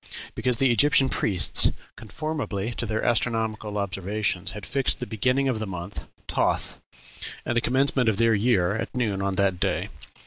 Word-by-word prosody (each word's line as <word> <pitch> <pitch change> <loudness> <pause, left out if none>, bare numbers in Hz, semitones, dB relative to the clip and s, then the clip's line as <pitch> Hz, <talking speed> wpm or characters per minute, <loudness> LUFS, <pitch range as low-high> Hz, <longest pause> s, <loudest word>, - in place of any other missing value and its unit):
because 125 -2 +1
the 135 0 +3
Egyptian 135 +3 +4
priests, 95 -8 +3 0.2
conformably 120 -3 -4
to 120 - -3
their 110 +1 -1
astronomical 110 -2 0
observations, 100 0 -2
had 105 -2 -7
fixed 135 -2 0
the 125 - -3
beginning 125 +5 +1
of 125 -4 0
the 110 - -3
month 90 +1 -6 0.2
Toth, - - -1 0.6
and 120 - -1
the 120 - +3
commencement 130 -1 +2
of 105 - 0
their 115 0 +4
year, 100 -3 +2
at 115 +3 -4
noon 105 -6 0
on 100 -1 -1
that 95 -2 +1
day. - - 0
110 Hz, 165 wpm, -25 LUFS, 100-125 Hz, 0.6 s, Egyptian